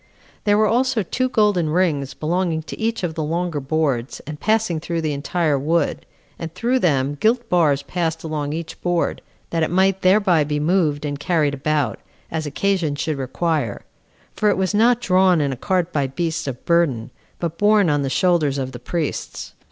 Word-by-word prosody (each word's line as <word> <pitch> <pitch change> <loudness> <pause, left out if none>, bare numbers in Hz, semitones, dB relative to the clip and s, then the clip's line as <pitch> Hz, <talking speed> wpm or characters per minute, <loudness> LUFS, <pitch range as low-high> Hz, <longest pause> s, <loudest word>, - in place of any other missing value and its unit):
There 205 -1 +4
were 215 - +4
also 240 0 +1
two 255 +8 -1
golden 205 -9 +2
rings 150 -5 0
belonging 165 0 -1
to - - -8
each 225 -2 -1
of 170 -2 -1
the 160 - -3
longer 165 +1 -1
boards, 135 -3 -1
and 150 0 -7
passing 215 -5 +1
through 165 +1 -3
the 155 -2 -1
entire 150 0 0
wood, 165 +5 0 0.3
and 165 -1 -5
through 245 +7 +1
them 140 - +1
gilt 235 +4 +2
bars 150 -6 +3
passed 165 0 -2
along 150 -2 -3
each 160 +1 -6
board, 175 -1 0 0.3
that 165 - 0
it 160 - +1
might 190 +1 +2
thereby 185 -4 +4
be 150 0 -2
moved 155 -2 +1
and 145 -1 -3
carried 150 -3 +1
about, 140 -3 -1 0.3
as 155 -2 -2
occasion 170 -1 0
should 150 -1 -2
require; 135 -3 -1 0.5
for 210 - +2
it - - +1
was 190 0 0
not 235 +3 +4
drawn 185 -3 +4
in 140 -2 0
a - - -4
cart 180 +5 -1
by 140 -2 +1
beasts 160 +3 -3
of 130 -2 -6
burden, 150 -10 +1 0.3
but 170 -1 -4
borne 205 -2 +4
on 145 -2 +2
the 135 - -1
shoulders 155 -3 +2
of 130 -1 -3
the 120 - -8
priests. 160 +5 -4
165 Hz, 185 wpm, -21 LUFS, 145-185 Hz, 0.5 s, There